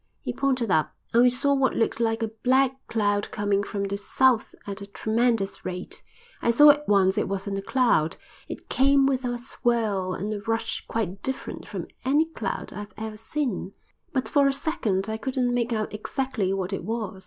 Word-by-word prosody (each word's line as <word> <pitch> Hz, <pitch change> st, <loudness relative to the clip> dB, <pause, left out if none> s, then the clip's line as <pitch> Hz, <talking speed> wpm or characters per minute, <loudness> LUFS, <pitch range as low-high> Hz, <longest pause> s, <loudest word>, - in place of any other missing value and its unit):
He -, -, -4 dB
pointed 255 Hz, -6 st, 0 dB
up, 155 Hz, -3 st, +1 dB, 0.2 s
and 235 Hz, -, +6 dB
we 250 Hz, -, +7 dB
saw 270 Hz, +3 st, +2 dB
what 270 Hz, -2 st, +2 dB
looked 225 Hz, -, 0 dB
like 225 Hz, 0 st, +1 dB
a 220 Hz, -, -2 dB
black 260 Hz, +1 st, +4 dB, 0.2 s
cloud 205 Hz, -2 st, 0 dB
coming 205 Hz, -1 st, 0 dB
from 200 Hz, 0 st, -3 dB
the 200 Hz, 0 st, -2 dB
south 250 Hz, +2 st, +2 dB
at 200 Hz, 0 st, -6 dB
a 200 Hz, -, -7 dB
tremendous 220 Hz, -2 st, 0 dB
rate. 180 Hz, 0 st, -5 dB, 0.4 s
I -, -, +1 dB
saw 295 Hz, +5 st, +9 dB
at 295 Hz, +1 st, -3 dB
once 195 Hz, 0 st, +4 dB
it -, -, -1 dB
wasn't 195 Hz, 0 st, -2 dB
a -, -, -4 dB
cloud; 230 Hz, -9 st, +2 dB, 0.3 s
it -, -, -8 dB
came 275 Hz, +1 st, +4 dB
with 265 Hz, -1 st, +1 dB
a 245 Hz, -1 st, -1 dB
swirl 225 Hz, -6 st, -1 dB
and 210 Hz, +3 st, -3 dB
a 205 Hz, -, -5 dB
rush 225 Hz, +1 st, -2 dB
quite 200 Hz, -4 st, -3 dB
different 265 Hz, +4 st, -5 dB
from -, -, -5 dB, 0.2 s
any 290 Hz, +5 st, +3 dB
cloud 275 Hz, -11 st, -5 dB
I've 205 Hz, +2 st, -8 dB
ever 220 Hz, 0 st, -5 dB
seen. 225 Hz, -5 st, -3 dB, 0.4 s
But 260 Hz, -2 st, -1 dB
for 280 Hz, -1 st, +4 dB
a 275 Hz, -, +2 dB
second 265 Hz, -, -1 dB
I 220 Hz, 0 st, -2 dB
couldn't 255 Hz, 0 st, -1 dB
make 240 Hz, -1 st, 0 dB
out 215 Hz, -2 st, -2 dB
exactly 220 Hz, -2 st, -2 dB
what 195 Hz, 0 st, -2 dB
it 195 Hz, -, -3 dB
was. 215 Hz, -1 st, -4 dB
225 Hz, 195 wpm, -26 LUFS, 200-260 Hz, 0.4 s, saw